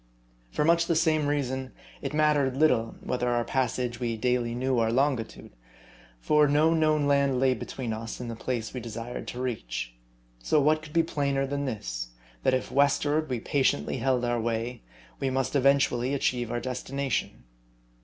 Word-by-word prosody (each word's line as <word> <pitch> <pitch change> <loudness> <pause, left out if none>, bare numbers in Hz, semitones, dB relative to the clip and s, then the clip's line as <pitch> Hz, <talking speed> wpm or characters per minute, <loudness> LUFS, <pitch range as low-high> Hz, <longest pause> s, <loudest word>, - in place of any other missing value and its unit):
For 150 - 0
much 170 +1 +3
the 170 - +2
same 155 -2 +2
reason, 130 -2 -2 0.3
it - - -3
mattered 150 -3 +2
little, 125 -7 +2
whether 125 -1 -1
on 120 - +1
our 120 - +1
passage 125 -1 -1
we 115 -2 -2
daily 120 0 0
knew 130 0 0
our 115 -1 +2
longitude; 130 -2 -1 0.7
for 150 - +4
no 150 +3 +4
known 155 -2 +2
land 140 -2 +2
lay 130 0 +4
between 125 -2 -5
us 110 +1 -6
and 125 - -5
the 115 - -5
place 115 -1 -3
we 125 - -4
desired 115 +1 -6
to 125 - -6
reach. 105 - -4 0.5
So 150 - +2
what 155 +2 +3
could 155 -1 -12
be 165 - +4
plainer 140 -4 0
than 140 +1 -2
this: - - -4 0.3
that 130 - +3
if 130 - -3
westward 145 +2 +2
we 125 -2 -1
patiently 130 - +1
held 130 -2 +1
on 120 - 0
our 120 -1 0
way, 115 +2 -2 0.4
we 135 - 0
must 130 +1 -1
eventually 140 -1 +3
achieve 120 -4 -1
our 120 - -1
destination 130 - -3
130 Hz, 175 wpm, -27 LUFS, 120-145 Hz, 0.7 s, for